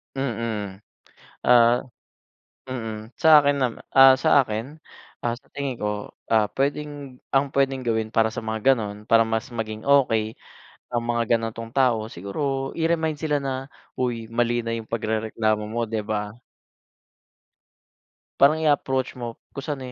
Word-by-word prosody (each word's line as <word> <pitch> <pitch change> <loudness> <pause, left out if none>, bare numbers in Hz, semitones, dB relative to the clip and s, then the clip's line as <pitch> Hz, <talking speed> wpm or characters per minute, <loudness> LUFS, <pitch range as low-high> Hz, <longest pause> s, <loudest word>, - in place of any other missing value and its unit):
Mm, 115 -7 -3 0.7
ah, 120 -1 +6 1.0
mm. 120 -3 -4 0.3
Sa 160 - +5
akin 145 0 +3
nama 125 -3 0 0.2
ah, 135 0 +10
sa 160 - +3
akin. 110 -3 -2 0.6
Ah, 120 -1 0
sa - - -32
tingin 140 -2 -3
ko. - - 0 0.4
Ah, 110 -2 +4
pwedeng 145 -1 -3 0.2
ang 135 +1 +4
pwedeng 135 -1 +1
gawin 110 -1 0
para 110 0 +4
sa 115 - -7
mga 110 0 -2
ganon, 105 -6 0
para 115 0 +7
mas 110 +2 -1
maging 110 -1 -4
okey 115 -6 +3 0.6
ang 120 - +1
mga 120 0 +1 0.2
ganitong 115 0 -6
tao, 125 -5 +2
siguro 135 - -3
i-remind 165 -1 +1
sila 150 -1 0
na, 135 -1 -3 0.3
"Uy, 120 -3 -2
mali 120 +1 +1
na 115 0 -3
yung 115 - -7
pagrereklamo 110 -1 -1
mo." 115 +2 -2
Di 110 -1 -2
ba? 105 -1 -3 2.0
Parang, 140 +3 +6
i-approach 135 -4 +1
mo 120 -2 -6 0.2
kung 140 - -6
saan, 145 -3 -4
120 Hz, 140 wpm, -24 LUFS, 110-135 Hz, 2.0 s, ah